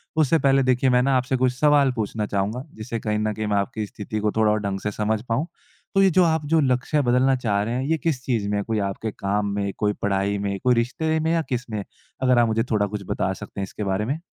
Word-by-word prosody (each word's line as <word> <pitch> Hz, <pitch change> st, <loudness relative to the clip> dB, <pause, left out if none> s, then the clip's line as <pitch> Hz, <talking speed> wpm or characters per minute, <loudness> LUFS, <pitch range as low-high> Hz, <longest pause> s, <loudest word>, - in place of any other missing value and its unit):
उससे 160 Hz, +1 st, +3 dB
पहले 135 Hz, -1 st, +3 dB
देखिए 130 Hz, 0 st, +2 dB
मैं 125 Hz, 0 st, +4 dB
न -, -, 0 dB
आपसे 130 Hz, 0 st, +2 dB
कुछ 125 Hz, 0 st, +2 dB
सवाल 145 Hz, -3 st, +4 dB
पूछना 110 Hz, -1 st, -2 dB
चाहूँगा, 105 Hz, +5 st, -2 dB
जिससे 115 Hz, +1 st, -5 dB
कहीं 105 Hz, -1 st, -1 dB
न 110 Hz, 0 st, 0 dB
कहीं 110 Hz, +1 st, -3 dB
मैं 105 Hz, -1 st, +1 dB
आपकी 105 Hz, +2 st, -2 dB
स्थिति 105 Hz, +1 st, -5 dB
को 105 Hz, 0 st, 0 dB
थोड़ा 110 Hz, -1 st, +3 dB
और 105 Hz, -, +1 dB
ढंग 100 Hz, -1 st, -2 dB
से 105 Hz, -, -3 dB
समझ 105 Hz, +1 st, -1 dB
पाऊँ, 130 Hz, +9 st, 0 dB, 0.5 s
तो 195 Hz, -, +5 dB
ये 195 Hz, -, +6 dB
जो 185 Hz, +1 st, +4 dB
आप 160 Hz, -2 st, +1 dB
जो 160 Hz, -, +5 dB
लक्ष्य 135 Hz, +2 st, +1 dB
बदलना 130 Hz, +1 st, +3 dB
चाह 105 Hz, -5 st, 0 dB
रहे 115 Hz, +3 st, -3 dB
हैं, 130 Hz, -, -1 dB
ये 160 Hz, -, +2 dB
किस 145 Hz, -6 st, -2 dB
चीज़ 115 Hz, -6 st, 0 dB
में 105 Hz, -, 0 dB
है? 100 Hz, -, -1 dB
कोई 110 Hz, -1 st, -1 dB
आपके 100 Hz, +2 st, -3 dB
काम 100 Hz, +1 st, -1 dB
में, 100 Hz, -1 st, -1 dB
कोई 105 Hz, -1 st, +1 dB
पढ़ाई 100 Hz, 0 st, 0 dB
में, 100 Hz, -1 st, -2 dB
कोई 125 Hz, -1 st, +4 dB
रिश्ते 155 Hz, +7 st, 0 dB
में 160 Hz, +1 st, 0 dB
या 165 Hz, -, +2 dB
किसमें? 115 Hz, -5 st, -3 dB, 0.4 s
अगर 125 Hz, -2 st, +4 dB
आप 120 Hz, -, +4 dB
मुझे 110 Hz, 0 st, +1 dB
थोड़ा 105 Hz, -1 st, +2 dB
कुछ 105 Hz, 0 st, -5 dB
बता 95 Hz, -, 0 dB
सकते 95 Hz, -, -9 dB
हैं -, -, -1 dB
इसके 95 Hz, +2 st, -6 dB
बारे 100 Hz, +1 st, -1 dB
में। 140 Hz, +7 st, -2 dB
115 Hz, 260 wpm, -23 LUFS, 105-130 Hz, 0.5 s, ये